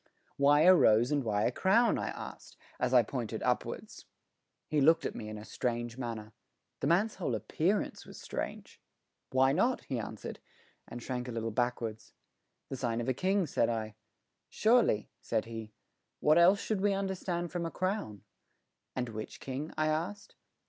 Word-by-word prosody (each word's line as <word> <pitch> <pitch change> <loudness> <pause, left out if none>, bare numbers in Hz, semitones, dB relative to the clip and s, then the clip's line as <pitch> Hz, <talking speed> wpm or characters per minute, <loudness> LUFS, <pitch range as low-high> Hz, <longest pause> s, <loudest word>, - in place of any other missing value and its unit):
"Why 145 +1 +5
a 180 +3 +8
rose 120 -7 +5
and 145 -2 +1
why 105 -2 0
a - - +2
crown?" 210 - +3
I - - -2
asked - - -9 0.2
as - - +1
I - - +6
pointed - - -4
upwards. - - -2 0.6
He 150 -2 +1
looked 160 +4 +5
at - - -2
me 105 - -6
in 110 - -6
a 105 - -9
strange 120 -1 -2
manner. 115 -4 -5 0.5
The - - -1
man's 195 +7 +3
whole 150 - -1
appearance 160 - -1
was - - -12
strange. - - -6 0.5
"Why 130 +1 +4
not?" 240 - +1
he 130 -3 -3
answered, 110 -1 -6 0.5
and 120 0 -8
shrank 125 -1 -3
a - - -4
little 115 -1 -3
backwards. 115 -2 -2 0.6
"The 135 - -4
sign 120 -2 -1
of 120 +2 -2
a - - +3
king," 190 +6 +1
said 120 -5 +1
I. 110 -2 -2 0.6
"Surely," 220 - +3
said 110 -2 -1
he. 115 -1 -7 0.5
"What 155 +3 +5
else 185 +4 +6
should 210 -2 -2
we 205 0 +3
understand 185 -3 -2
from 175 -2 -2
a - - -3
crown?" 185 - -3 0.7
"And 125 -1 -1
which 110 -1 -7
king?" 135 +4 -5
I 155 - +2
asked. 175 +7 -2
135 Hz, 170 wpm, -31 LUFS, 115-180 Hz, 0.7 s, a